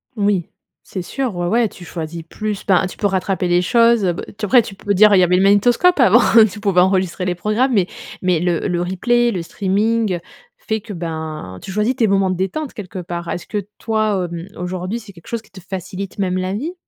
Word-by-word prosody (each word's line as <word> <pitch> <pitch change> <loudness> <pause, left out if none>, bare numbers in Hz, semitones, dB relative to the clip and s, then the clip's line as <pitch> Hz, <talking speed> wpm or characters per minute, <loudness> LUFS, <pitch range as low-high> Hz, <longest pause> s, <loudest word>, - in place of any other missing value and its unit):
Oui, 200 -4 0 0.3
c'est 185 - -6
sûr, 255 -2 -3
ouais, 175 0 -2
ouais, 230 +1 +2
tu 175 - -13
choisis 165 0 -6
plus, 210 +4 -5
ben, 185 -1 +3
tu - - -11
peux 205 - -2
rattraper 190 -1 -1
les 175 0 +3
choses, 230 +3 +4
heu. 175 - +2
B - - -6 0.2
après 235 +4 +5
tu 200 -3 -9
peux 205 +1 -1
dire: 210 +2 +6
«il - - +5
y - - +5
avait 180 +1 +3
le 190 - +3
magnétoscope 240 - +4
avant, 240 -1 +6 0.3
tu 210 - -9
pouvais 195 -3 +3
enregistrer 185 -1 +1
les 180 -1 -1
programmes», 220 +8 0
mais 190 -4 +3 0.3
mais 180 -3 +2
le 175 +2 0
le 175 -2 -1
replay, 240 +7 +1
le 180 - -3
streaming 205 +1 0 0.4
fait 220 -2 -3
que, 215 -1 -8
ben, 160 - -5
tu 190 - -7
choisis 210 +6 0
tes 230 -4 +2
moments 195 -1 +2
de 185 - 0
détente 255 +11 -3
quelque 190 -3 -7
part. 170 -1 -5
Est-ce 175 - -4
que 205 -2 -4
toi, 215 -5 0
hem, 170 +2 -6
aujourd'hui, 185 +5 -3
c'est 205 -3 -13
quelque 170 -2 -17
chose 235 -2 -3
qui 210 -3 -25
te 190 - -12
facilite 190 +1 -6
même 185 -1 0
la 185 +1 -2
vie? 300 - -3
195 Hz, 225 wpm, -19 LUFS, 180-215 Hz, 0.4 s, dire